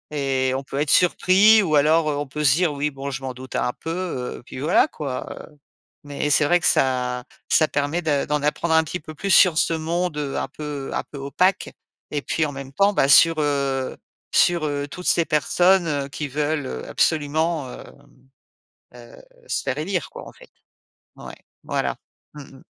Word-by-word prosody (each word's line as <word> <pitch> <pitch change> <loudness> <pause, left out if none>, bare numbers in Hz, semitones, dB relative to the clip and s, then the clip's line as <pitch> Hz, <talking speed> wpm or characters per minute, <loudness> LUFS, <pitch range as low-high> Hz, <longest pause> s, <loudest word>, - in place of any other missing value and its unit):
et 135 -2 0
on 135 - -3
peut 140 +1 -5
être 150 0 0
surpris 195 +4 +5
ou 160 -5 -2
alors 155 +2 +3
heu 145 - -2
on 145 - -4
peut 150 +3 -5
se 130 -4 +5
dire: 175 0 +1
«Oui, 145 +1 -2
bon, 140 0 -6
je 135 0 -6
m'en 130 - -4
doutais 130 +1 -7
un 125 - 0
peu», 165 - -6 0.5
heu, - - -14
puis - - -9
voilà 165 - +3
quoi, 140 - -5 0.2
heu, 150 - -22 0.5
mais 145 0 -3
c'est 150 - +3
vrai 175 +5 +3
que 175 - -2
ça 125 -1 +1 0.3
ça 155 - +3
permet 145 +4 -1
de 145 -4 0
d'en 150 0 -1
apprendre 160 +2 0
un 160 - +5
petit 160 +3 -5
peu 155 0 -11
plus 195 +6 -4
sur 180 -4 +6
ce 170 -1 +2
monde, 165 +1 -2
heu, 145 -2 -3
un - - -2
peu 145 -3 -6
un - - -2
peu 145 - -11
opaque, 180 +8 0 0.4
et 145 - -2
puis 155 +2 -1
en 145 - -6
même 135 -1 -9
temps 200 +8 +3
bah, 135 - +3
sur, 165 +4 +6
heu, 140 -3 -1 0.4
sur, 170 -2 +3
heu, 145 -1 -3
toutes 180 - -8
ces 170 - +3
personnes, 175 +4 +2
heu, 145 -3 -2
qui 145 +1 -5
veulent 150 +2 -2
heu 65 0 -6
absolument, 155 -2 0
hem, - - -13 0.9
heu, 120 -1 -14 0.3
se - - -1
faire 135 0 -2
élire 180 +3 -3
quoi - - -10
en - - -13
fait. - - -18 0.7
Ouais, - - -10 0.3
voilà. - - -2 0.4
Mmh 140 -2 -12
mh. - - -19
150 Hz, 205 wpm, -22 LUFS, 140-165 Hz, 0.9 s, sur